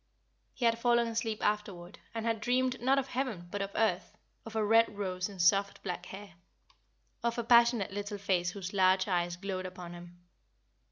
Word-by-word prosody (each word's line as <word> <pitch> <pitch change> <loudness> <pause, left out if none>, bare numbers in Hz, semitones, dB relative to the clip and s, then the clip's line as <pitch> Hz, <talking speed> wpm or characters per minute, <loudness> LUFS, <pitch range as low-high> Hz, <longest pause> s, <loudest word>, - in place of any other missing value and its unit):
He 245 - -1
had 230 0 +3
fallen 235 0 +3
asleep 225 -1 -2
afterward, 200 -4 -2 0.2
and 225 0 -3
had 225 -2 0
dreamed 255 +2 0
not 265 +3 +3
of 270 -1 -1
heaven 245 -10 -3
but 205 - -3
of 195 - -2
earth, 215 -5 0 0.3
of 225 - -9
a 220 -1 +1
red 225 -1 +4
rose 185 -1 -2
in 200 - -11
soft 195 +3 +2
black 180 -1 -5
hair, 200 +1 -9
and - - -21 0.9
of 235 0 -1
a 235 - -1
passionate 235 -3 +4
little 205 +1 -4
face 185 -3 0
whose 190 +1 -6
large 190 0 +3
eyes 175 -2 0
glowed 185 0 -4
upon 180 -1 -9
him. 175 0 -12
205 Hz, 185 wpm, -31 LUFS, 185-230 Hz, 0.9 s, red